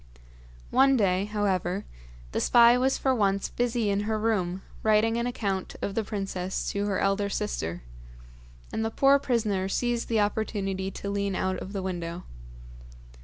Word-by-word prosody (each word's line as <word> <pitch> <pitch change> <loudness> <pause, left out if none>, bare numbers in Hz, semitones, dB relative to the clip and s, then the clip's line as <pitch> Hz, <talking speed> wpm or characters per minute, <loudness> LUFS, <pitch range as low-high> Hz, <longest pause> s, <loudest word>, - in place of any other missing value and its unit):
One 270 +1 +5
day, 190 -2 +2
however, 200 -2 -1 0.5
the - - -1
spy 235 0 +6
was 260 +2 +2
for 265 - +1
once 200 -4 +1
busy 240 -3 0
in 200 - +1
her 220 - +1
room 195 -4 -1 0.2
writing 220 +1 +3
an 235 +1 0
account 200 -6 -3
of 200 - -3
the 225 - 0
princess 195 -3 -3
to 200 0 -1
her 200 -2 0
elder 195 +1 +1
sister, 90 - -3 0.9
and 220 - -1
the 225 - 0
poor 275 +4 +4
prisoner 215 -8 0
seized 240 +3 -1
the 225 -2 +2
opportunity 200 -2 -1
to 200 +1 -6
lean 200 -1 -1
out 185 0 -1
of 190 - -7
the 195 -2 -4
window. 175 -1 -4
205 Hz, 160 wpm, -27 LUFS, 190-225 Hz, 0.9 s, spy